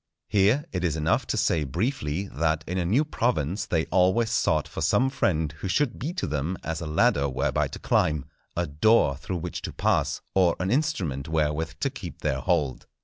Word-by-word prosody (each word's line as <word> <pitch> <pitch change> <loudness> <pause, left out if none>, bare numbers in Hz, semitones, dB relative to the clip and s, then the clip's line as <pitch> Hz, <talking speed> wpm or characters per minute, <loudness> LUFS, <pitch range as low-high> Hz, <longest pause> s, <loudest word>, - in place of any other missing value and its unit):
Here 105 +9 +3
it 90 - -2
is 80 -3 +1
enough 80 +1 +1
to - - -1
say 80 -3 +2
briefly, 85 - -2
that 80 +1 0
in 90 +1 -2
a 90 - 0
new 120 - +2
province 105 - -1
they 80 -2 +1
always 95 +5 +3
sought 80 -9 +1
for - - -6
some 135 +1 +2
friend 80 - 0
who - - -4
should 120 +6 0
be 145 +7 -2
to 180 - -2
them 75 +5 -2
as 80 0 -3
a 85 - -4
ladder 70 -2 +2
whereby 65 +1 0
to - - -8
climb, 75 -3 +1 0.3
a 85 - +1
door 75 0 +3
through 75 +7 -4
which 85 +1 -5
to - - -5
pass, - - 0
or 90 -3 +4
an 90 +2 -1
instrument 95 - -1
wherewith 80 0 0
to 135 - +1
keep 100 - -9
their 65 - 0
hold. 75 -5 0
85 Hz, 200 wpm, -26 LUFS, 75-105 Hz, 0.3 s, or